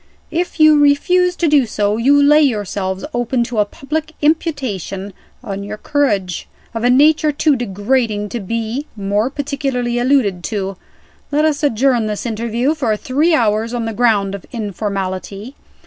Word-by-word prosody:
If 345 0 -2
you 310 -1 +6
refuse 355 +5 +3
to 340 - 0
do 290 -5 +4
so, 210 0 0
you 275 +5 +4
lay 295 +2 +5
yourselves 200 -7 -1
open 240 0 0
to 235 -2 -3
a 210 - +4
public 310 +8 -5
imputation 250 - -1 0.3
on 200 0 -5
your 210 +1 -6
courage, 205 - -1 0.3
of 225 0 -4
a 245 - +3
nature 300 +4 +4
too 295 0 +2
degrading 215 -1 -1
to 240 - -4
be 230 +7 -3
more 205 +3 0
particularly 270 -4 -2
alluded 240 -9 +1
to. 195 -3 -3 0.6
Let 300 +2 +2
us 305 -1 0
adjourn 250 -4 +2
this 210 +2 -4
interview 235 +4 -1
for 235 -9 -1
three 300 +9 +1
hours 225 -1 0
on 235 -1 -2
the 225 - -3
ground 210 -4 +2
of 200 - -7
informality. 200 0 -4
240 Hz, 155 wpm, -17 LUFS, 205-285 Hz, 0.6 s, you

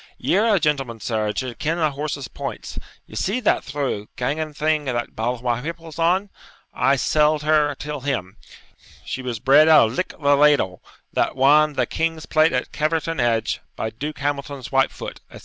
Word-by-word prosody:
Ye're 215 +4 +2
a - - +3
gentleman, 135 -7 -1
sir, 110 -1 -1
and 105 - -3
should 130 -3 -4
ken 160 +3 -1
a 155 -3 +1
horse's 140 -1 -4
points; - - -6 0.3
ye - - -17
see 205 +7 0
that 220 - +2
through 135 -7 -3
ganging 150 +5 -2
thing 150 0 0
that 120 -2 -3
Balmawhapple's 125 +8 -3
on; 185 +4 +2 0.4
I 135 - +3
selled 150 +2 +2
her 150 -1 +2
till 150 +1 -5
him. 120 -8 -3 0.7
She 130 - -4
was 125 -2 -4
bred 140 +7 +5
out 150 -8 +7
of - - -7
Lick 185 - -3
the 145 -1 +4
ladle, 140 -11 +3 0.3
that - - 0
wan 150 +3 +5
the 130 -3 +1
king's 165 +3 -2
plate 155 +1 +3
at 125 0 -2
Caverton 160 +1 -1
Edge, 115 -2 0
by 110 - -3
Duke 145 +7 -6
Hamilton's 140 -2 -4
White 135 0 +3
Foot,' - - -8
etc. - - -12
145 Hz, 180 wpm, -22 LUFS, 125-155 Hz, 0.7 s, out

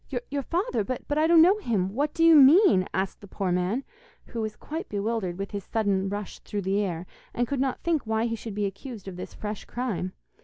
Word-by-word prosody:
'Your 285 0 -1
father? 305 - -1
but 255 +6 -3
I 310 +1 +3
don't 330 -1 +7
know 385 +5 +5
him. 200 - -1
What 290 +5 0
do 330 - +2
you 330 -1 +8
mean?' 290 - +7
asked 190 0 -2
the 200 - -11
poor 190 -1 -2
man, 180 +9 0 0.4
who 230 - -5
was 215 -1 -3
quite 320 +3 -6
bewildered 205 -3 -2
with 195 0 -5
his 200 -2 -4
sudden 195 -3 0
rush 205 0 -5
through 205 -1 -4
the 195 +2 +1
air, 180 -4 -2 0.3
and 240 0 +1
could 280 +1 -2
not 265 -2 -1
think 320 -8 0
why 220 +1 +1
he 230 -1 -1
should 220 -2 -7
be 205 0 0
accused 200 +1 -7
of 190 - -6
this 180 - -8
fresh 210 -1 -5
crime. 210 -7 -3
220 Hz, 225 wpm, -27 LUFS, 195-275 Hz, 0.4 s, you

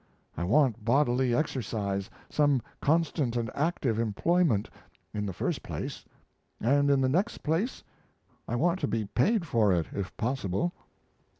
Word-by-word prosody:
I 85 - -3
want 120 0 +3
bodily 125 0 +2
exercise 105 -8 -2 0.2
some 145 -5 +2 0.2
constant 155 -5 +1
and 115 -2 -1
active 140 -7 0
employment, 115 - +2 0.5
in 105 -1 -2
the - - -2
first 90 - -2
place; - - -6 0.5
and, 140 +4 +3
in 140 -1 +4
the 130 - +3
next 185 - 0
place, 165 - -1 0.6
I 120 - -1
want 170 +7 +2
to 145 - 0
be 110 -3 -1
paid 170 - +1
for 110 -9 +3
it, 85 -3 +2
if 100 -2 -5
possible. 125 - -1
125 Hz, 140 wpm, -29 LUFS, 110-150 Hz, 0.6 s, in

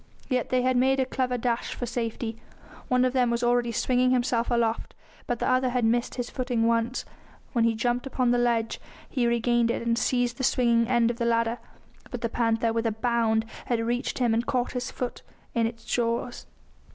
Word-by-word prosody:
Yet 255 -3 0
they 255 -1 +2
had 255 0 +2
made 265 +2 +3
a 260 - +2
clever 255 -1 -1
dash 235 0 -1
for 245 - -3
safety; 230 -1 -4 0.5
one 250 0 +3
of 255 - 0
them 250 -2 +3
was 235 0 -1
already 240 0 +2
swinging 250 +2 +2
himself 245 -2 +1
aloft, 235 -2 0 0.3
but 245 - -1
the - - -1
other 255 0 +2
had 245 -2 0
missed 235 +2 +1
his 245 -1 -3
footing 245 -3 -1
once, 230 +2 0 0.5
when 235 -3 +3
he 230 -1 +2
jumped 245 +3 -1
upon 255 -2 +1
the 245 - +3
ledge; 235 -2 0 0.3
he 245 -4 0
regained 235 0 +2
it 235 - -2
and 230 0 +1
seized 245 -1 0
the - - -2
swinging 235 -3 +3
end 240 -1 +3
of 240 - -9
the - - 0
ladder, 230 0 +1 0.5
but 245 - -6
the 230 - -1
panther, 230 -1 +1
with 230 0 0
a - - +1
bound, 225 0 +1 0.2
had 240 -2 +1
reached 240 +2 -1
him 240 -3 +2
and 230 +2 0
caught 250 -1 0
his 250 -1 -3
foot 250 -1 -5 0.3
in 230 -1 +2
its 230 0 -9
jaws. 240 +1 -2
240 Hz, 205 wpm, -26 LUFS, 230-250 Hz, 0.5 s, made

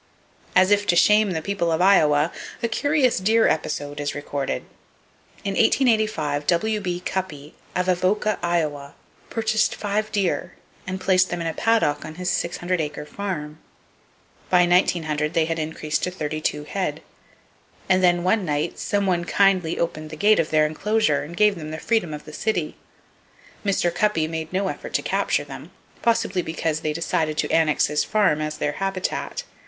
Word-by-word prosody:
As 185 +2 +5
if 205 0 +3
to 175 - +3
shame 210 +4 +5
the 160 -4 -3
people 200 -3 -1
of 160 - +1
Iowa, 160 -5 +4 0.3
a - - +3
curious 270 -1 +1
deer 220 +4 +3
episode 145 -1 -2
is 145 0 -3
recorded. 145 -1 -3 0.8
In 200 - -1
1885, 215 - +2
W.B. 180 -1 0
Cuppy, 155 -6 -4 0.2
of 180 0 0
Avoca, 190 +4 +1
Iowa, 150 -5 -2 0.3
purchased 220 -1 +1
five 210 +1 -2
deer, 185 -3 -1 0.3
and 185 +1 -3
placed 185 -1 +3
them 175 - -3
in 165 - -3
a 165 - -1
paddock 220 -11 +1
on 155 - -8
his 180 +1 -2
600 175 0 -1
acre 150 0 -5
farm. 155 -4 -5 0.9
By 180 -1 +5
1900 160 -3 +1
they 165 - +3
had 165 0 -2
increased 155 0 -2
to - - 0
32 155 -3 -3
head; 155 -2 -3 0.8
and 185 -1 +3
then 175 -1 +3
one 200 +3 +2
night 150 0 -2
some 200 -1 0
one 175 -2 +1
kindly 185 -3 +2
opened 155 -2 -3
the 155 - -7
gate 210 +7 +4
of 160 - +1
their 155 -1 +3
enclosure, 210 +8 +1
and 165 +4 -8
gave 210 -1 +5
them 155 -2 -7
the 155 - -5
freedom 220 -4 0
of 150 0 -7
the 155 - -11
city. 175 -4 -2 0.9
Mr. 190 -4 +1
Cuppy 180 -5 +1
made 160 0 -5
no 190 +1 0
effort - - -5
to - - +1
capture - - 0
them, - - -10 0.3
possibly 225 -5 +1
because 160 -1 -2
they 155 - -2
decided 155 -1 -1
to - - -1
annex 160 -2 +3
his 150 0 0
farm 195 -8 +2
as 155 0 -3
their 150 - -1
habitat. 195 - -2
175 Hz, 170 wpm, -23 LUFS, 155-200 Hz, 0.9 s, As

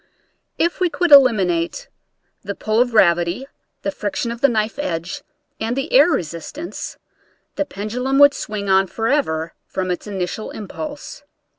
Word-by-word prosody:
If 340 +1 0
we 365 -1 +2
could 330 +2 0
eliminate 220 - +4 0.5
the 200 0 -5
pull 215 +2 +1
of 245 - +2
gravity, 175 +1 +3 0.4
the 195 - -1
friction 205 +4 -3
of 235 0 -7
the 280 - +5
knife 220 +3 -1
edge, 170 - -3 0.4
and 225 +2 -2
the 270 - -3
air 285 +6 +7
resistance, 175 - -4 0.6
the 295 - 0
pendulum 250 +5 -2
would 285 0 +7
swing 210 -2 -5
on 190 0 +4
forever 225 - -1
from 185 -1 -2
its 180 - -4
initial 195 +1 -4
impulse. 295 - -7
220 Hz, 145 wpm, -20 LUFS, 190-280 Hz, 0.6 s, air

